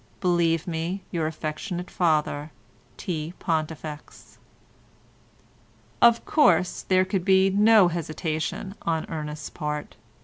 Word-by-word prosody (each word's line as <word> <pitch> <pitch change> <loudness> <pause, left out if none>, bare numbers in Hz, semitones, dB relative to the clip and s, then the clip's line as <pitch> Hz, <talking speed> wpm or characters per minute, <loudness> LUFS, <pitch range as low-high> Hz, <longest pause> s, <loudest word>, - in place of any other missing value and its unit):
Believe 170 -2 +1
me, 175 +3 -3
Your 165 -3 -1
affectionate 165 +4 -5
father, 155 -3 0 0.5
T. 165 -1 -4
PONTIFEX." 155 -2 -5 1.6
Of 235 -1 +5
course 180 - +3
there 185 0 +2
could 190 -1 -1
be 190 +1 +4
no 210 0 +6
hesitation 160 +2 -3
on 160 -1 -1
Ernest's 150 -2 -5
part. 150 -2 -5
165 Hz, 100 wpm, -25 LUFS, 155-185 Hz, 1.6 s, no